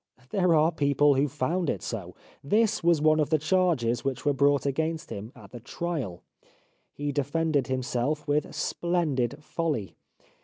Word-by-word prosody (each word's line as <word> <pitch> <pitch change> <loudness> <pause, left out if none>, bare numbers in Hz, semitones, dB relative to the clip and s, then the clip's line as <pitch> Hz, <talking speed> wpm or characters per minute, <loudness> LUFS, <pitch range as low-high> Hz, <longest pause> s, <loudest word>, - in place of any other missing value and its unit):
There 180 -4 +3
are 155 +2 +4
people 145 -2 +3
who 140 +2 +2
found 160 +5 -1
it - - -2
so. 95 -6 -5 0.3
This 215 +7 +2
was 170 -2 +4
one 155 0 +4
of 150 - +1
the 155 - +3
charges 155 -8 +1
which 135 0 -3
were 145 - +3
brought 140 0 +2
against 160 +4 -2
him 105 +3 -6
at - - -14
the 120 - -8
trial. 135 - -4 0.7
He 145 0 -3
defended 145 0 0
himself 130 +3 -2
with 145 +1 0
splendid 150 -6 -1
folly. 150 - -2
145 Hz, 155 wpm, -27 LUFS, 130-165 Hz, 0.7 s, are